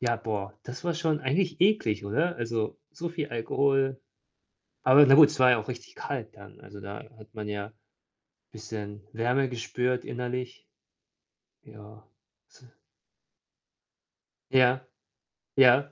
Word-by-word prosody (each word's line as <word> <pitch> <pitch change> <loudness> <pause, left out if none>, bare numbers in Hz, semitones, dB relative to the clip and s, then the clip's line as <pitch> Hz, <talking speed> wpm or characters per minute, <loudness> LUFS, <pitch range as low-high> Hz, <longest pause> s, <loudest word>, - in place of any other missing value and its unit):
ja, 120 -2 0
boah, 105 -3 -5
das 125 +7 -9
war 170 -1 0
schon 160 -2 -1
eigentlich 160 +5 -1
eklig, 180 - +2
oder? 160 +13 0
Also, 115 -2 -3
so 170 0 -5
viel 165 -3 -4
Alkohol. 135 +3 0 0.8
Aber 135 +3 +8
na 135 - +7
gut, 150 -1 +9
es 150 -2 -6
war 130 0 +7
ja 120 - +4
auch 110 - -7
richtig 120 -2 -8
kalt - - -6
dann, - - -15
also, 100 +1 -12
da 100 +1 -8 0.2
hat 110 0 -17
man 105 -1 -6
ja 105 0 -5 0.8
bisschen 105 -2 -8
Wärme 125 +4 0
gespürt 125 +1 -2
innerlich. 125 0 -5 1.0
Ja. 105 0 -15 0.5
Tz - - -23 1.9
Ja. 130 0 +3 0.7
Ja. 135 +2 +5
125 Hz, 130 wpm, -27 LUFS, 110-140 Hz, 1.9 s, gut